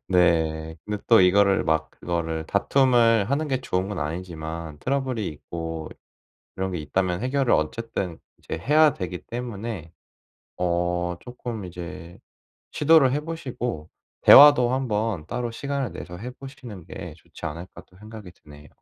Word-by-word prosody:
네. 80 -3 +2
근데 105 -1 -4
또 115 -4 +7
이거를 100 +2 +4
막 80 0 0
그거를 80 -2 -3
다툼을 115 -1 +3
하는 150 +2 0
게 130 -1 0
좋은 95 -5 -2
건 100 -3 -4
아니지만 80 -1 -5
트러블이 130 - -1
있고 80 +1 -6 0.7
이런 95 0 -2
게 90 - -3
있다면 90 +5 -1
해결을 130 0 +1
어쨌든 95 0 -2 0.2
이제 - - -6
해야 150 - +4
되기 90 -1 -5
때문에 115 -7 -6 0.7
어 90 0 -1
쪼끔 120 -4 -7
이제 90 0 -9 0.5
시도를 150 -4 +5
해 145 - 0
보시고 125 - -5 0.3
'대화도 135 -4 +9
한번 110 - -1
따로 120 +3 -3
시간을 140 +1 -3
내서 90 0 -8
해 125 +5 -6
보시는 125 - -11
게 90 -5 -8
좋지 80 - -10
않을까.' 85 +4 -8
또 90 - -23
생각이 105 -4 -11
드네요. 75 -2 -16
95 Hz, 295 characters per minute, -24 LUFS, 85-125 Hz, 0.7 s, 대화도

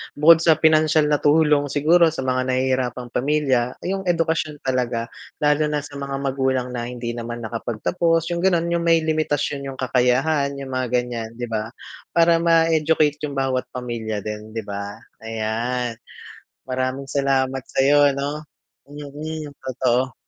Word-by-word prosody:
bukod 160 +2 +7
sa 165 -1 +4
pinansiyal 155 -1 +3
na 145 - +3
tulong 150 -1 +3
siguro 165 +5 +4
sa 155 -4 -3
mga 130 0 0
nahihirapang 130 -1 -1
pamilya, 130 -3 +1
yung 190 0 -3
edukasyon 160 -3 0
talaga, 125 -3 -1 0.3
lalo 150 +1 +3
na 150 -1 -2
sa 145 -1 -9
mga 140 0 -4
magulang 130 -2 0
na 120 -1 -4
hindi 120 -1 -5
naman 120 0 -6
nakapagtapos 135 +9 -1
yung 170 - -1
gano'n 170 -2 +1
yung 170 - +1
may 165 -1 +4
limitasyon 145 -3 -1
yung 135 - -6
kakayahan 135 +3 +1
yung 135 -1 -7
mga 130 -1 -1
gan'yan, 120 -2 -2
'di 120 - -7
ba 110 0 -2 0.5
para 165 0 +5
ma-educate 160 -2 +3
yung 140 - -7
bawat 130 -1 -1
pamilya 115 -4 -4
din, 105 +1 -7
'di 110 - -3
ba? 100 0 -6 0.2
Ayan 115 +2 -3 0.7
maraming 130 +1 -2
salamat 135 -2 0
sa - - -1 0.3
ano 145 +2 -4 0.4
yung 145 0 -10 0.3
yung 140 - -18
totoo. 130 0 0
135 Hz, 150 wpm, -22 LUFS, 125-155 Hz, 0.7 s, bukod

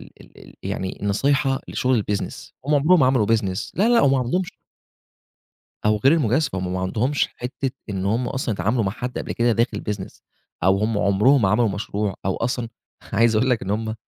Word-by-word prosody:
ال - - -13
ال - - -17
ال - - -15
يعني 95 - -4
النصيحة 135 +6 +1
لشُغل 125 -4 +1
الbusiness. 100 -1 -4
هم 150 - +2
عمرهم 155 +5 +4
ما 130 - +5
عملوا 130 -5 +2
business. 100 -4 0
لأ، 205 +5 +2
لأ، 240 -1 +5
هم 135 - +4
ما 135 - +3
عندهمش 170 +9 -1 1.3
أو 105 0 +3
غير 135 +8 +4
المجازفة، 135 - +1
هم 90 0 -3
ما 95 - -2
عندهومش 115 +10 0
حتّة 130 +1 -3 0.2
إن 95 -1 -3
هم 120 +4 0
أصلًا 130 -5 -2
اتعاملوا 110 +3 0
مع 95 - -1
حد 125 +1 -5
قبل - - -4
كده 120 0 +2
داخل 115 +2 0
business 100 -2 -6 0.4
أو 95 +2 +4
هم 105 0 0
عمرهم 105 +7 +3
ما 95 - +3
عملوا 110 +2 +3
مشروع 100 0 -3
أو 95 - 0
أصلًا 120 0 -2 0.4
عايز 115 +1 +3
أقول 130 +4 +2
لك 120 - +1
إن 95 - -4
هم 110 +1 -2
115 Hz, 200 wpm, -22 LUFS, 100-130 Hz, 1.3 s, ما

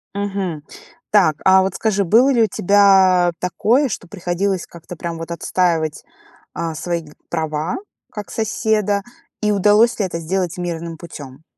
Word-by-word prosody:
Мгм. 195 -6 -3 0.5
Так, 185 -8 +4
а 190 0 +6
вот 190 0 -2
скажи, 205 -3 0
было 230 +9 +4
ли 235 -4 +3
у - - +3
тебя 190 -2 +4
такое, 225 - +1
что 185 - -6
приходилось 180 +1 -2
как-то 170 +1 -11
прям 170 0 -5
вот 165 +1 -7
отстаивать, 165 -2 -1 0.5
а, 165 -1 -4
свои 170 +1 -3 0.3
права 160 0 -2 0.3
как 205 -4 -8
соседа? 215 -2 0 0.4
И 210 -1 +2
удалось 210 +4 +3
ли 205 - +1
это 170 -2 -4
сделать 180 +2 -2
мирным 170 -2 -5
путем? 155 -4 -9
Мгм. 135 +4 -18
185 Hz, 150 wpm, -19 LUFS, 170-205 Hz, 0.5 s, а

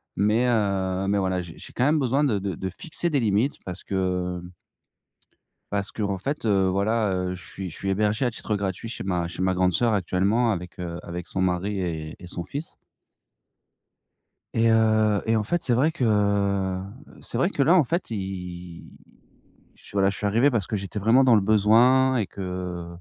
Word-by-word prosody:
Mais, 105 +5 +2
heu, 95 -4 0
mais 100 - +2
voilà, 95 -2 0
j'ai 85 -2 -10
j'ai - - -11
quand 125 - 0
même 150 +2 +3
besoin 135 +2 +1
de 110 -8 +1
de 95 -3 -3
de 95 +2 -4
fixer 170 - -4
des 145 -4 +1
limites 110 +5 +1
parce 90 -2 -6
que, 90 -2 -1
mmh 90 - -10 1.2
parce 100 -1 -1
qu'en 100 -2 -2
fait 140 +6 -4
heu, 95 -3 +3
voilà, 105 +3 +1
heu, 90 0 -1
je 90 - -9
suis 95 -2 -7
je - - -10
suis 95 - -4
hébergé 105 +5 +1
à 125 - +2
titre 110 -1 -3
gratuit 100 +1 -3
chez 115 - -5
ma 90 -3 -1
chez 90 +1 -5
ma 95 0 +2
grande 90 0 +2
sœur 115 +5 +2
actuellement 100 +5 +1
avec 90 -2 -6
heu, 85 -1 -5
avec 85 0 -6
son 95 - -3
mari 95 +2 0
et 80 -3 -4
et 90 - -10
son 85 -1 -5
fils. 145 - -7 1.8
Et 115 0 +3
heu, 110 -2 +3
et 115 0 +3
en 110 - +1
fait, 170 +11 -1
c'est 125 - +2
vrai 145 +7 +2
que 100 - +1 0.4
c'est - - -7
vrai 175 - +2
que 145 - 0
là 160 +6 +5
en 175 -5 +5
fait, 170 +4 -2
i 90 -4 -6 0.9
je - - -20
suis - - -9
voilà 95 -1 +3
je 100 - -6
suis 105 - -2
arrivé 115 +8 +3
parce 110 -8 -1
que - - -4
j'étais 100 +1 -5
vraiment 115 +6 +4
dans 125 -3 +6
le 105 - +5
besoin, 115 +6 +4
et 110 -5 0
que 90 -2 -5
100 Hz, 205 wpm, -25 LUFS, 90-115 Hz, 1.8 s, dans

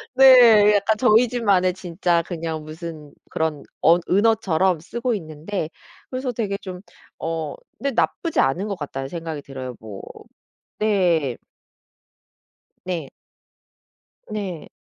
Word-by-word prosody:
네. 240 -6 +8
약간 205 +2 +2
저희 235 +1 +5
집만의 200 -7 +2
진짜 175 -1 0
그냥 165 -2 -5
무슨 155 -1 -9 0.2
그런 160 -3 -2 0.2
언 170 +2 +5
은어처럼 190 -4 +2
쓰고 235 +9 -3
있는데 160 -1 -4 0.4
그래서 255 0 -3
되게 210 -4 -2
좀 185 -2 -7 0.4
어 160 -2 -3 0.2
네 280 - -1
'나쁘지 325 +6 0
않은 175 +10 +1
것 200 - -3
같다.'는 135 -3 -5
생각이 160 -1 -5
들어요 130 -2 -7
뭐 105 -3 -9 0.8
네. 175 - +1 1.5
네. 170 -6 -4 1.2
네. 195 -6 -5
180 Hz, 215 characters per minute, -22 LUFS, 160-215 Hz, 1.5 s, 네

